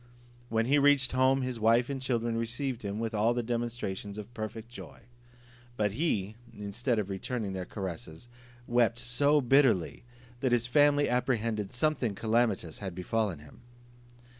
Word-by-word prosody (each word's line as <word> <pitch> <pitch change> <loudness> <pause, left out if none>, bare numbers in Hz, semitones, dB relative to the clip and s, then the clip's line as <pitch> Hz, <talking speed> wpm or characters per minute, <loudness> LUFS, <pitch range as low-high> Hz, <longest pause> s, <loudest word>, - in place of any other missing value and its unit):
When 115 0 +1
he 145 +4 +4
reached 140 -3 +4
home, 130 +1 +3
his 125 -2 -3
wife 115 +2 +4
and 135 -2 -4
children 120 -3 -1
received 120 +2 -2
him 100 0 -4
with 115 0 -3
all 110 +3 +2
the 120 - -1
demonstrations 115 -4 -3
of 105 +3 -8
perfect 110 0 -6
joy. 120 - -11 0.8
But 105 -1 +1
he, 110 - -1 0.2
instead 115 +4 -1
of 105 -3 -1
returning 100 +1 -3
their 95 -1 -4
caresses, 90 0 -7 0.4
wept 120 -1 +2
so 140 +5 +3
bitterly, 125 - +3 0.4
that 125 -1 +1
his 120 -1 +2
family 145 +3 +4
apprehended 115 -5 0
something 125 -5 0
calamitous 110 -7 0
had 95 -4 -5
befallen 100 0 -1
him. 75 0 -16
115 Hz, 150 wpm, -30 LUFS, 105-125 Hz, 0.8 s, he